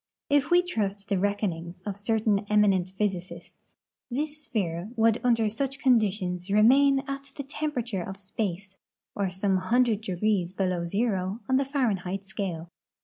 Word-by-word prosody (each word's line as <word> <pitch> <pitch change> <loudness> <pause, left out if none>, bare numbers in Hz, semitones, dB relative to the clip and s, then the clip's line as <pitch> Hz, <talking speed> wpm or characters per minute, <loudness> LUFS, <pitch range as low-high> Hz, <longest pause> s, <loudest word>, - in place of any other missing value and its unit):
If 285 -1 +3
we 355 0 +5
trust 205 - -3
the 195 - +1
reckonings 180 -3 -2
of 200 +1 -4
certain 215 0 +1
eminent 195 -4 +3
])h}'sicists, 180 -4 -4 0.3
this 300 +4 -3
sphere 180 -4 -2
would 225 0 +3
under 230 -3 +3
such 270 +5 -2
conditions 200 -7 +1
remain 270 +7 +5
at 275 0 -6
the 280 - -5
tempera 285 -2 -3
ture 215 -6 -3
of 195 +2 -7
space, 190 -1 -4 0.3
or 200 -2 -1
some 190 +1 0
hundred 225 +3 +2
degrees 190 -2 0
below 185 -3 -1
zero 195 +1 -1
on 260 0 +3
the 275 - +1
Fahren 260 -8 0
heit 190 +2 -4
scale. 180 -4 -5
205 Hz, 150 wpm, -27 LUFS, 185-245 Hz, 0.3 s, we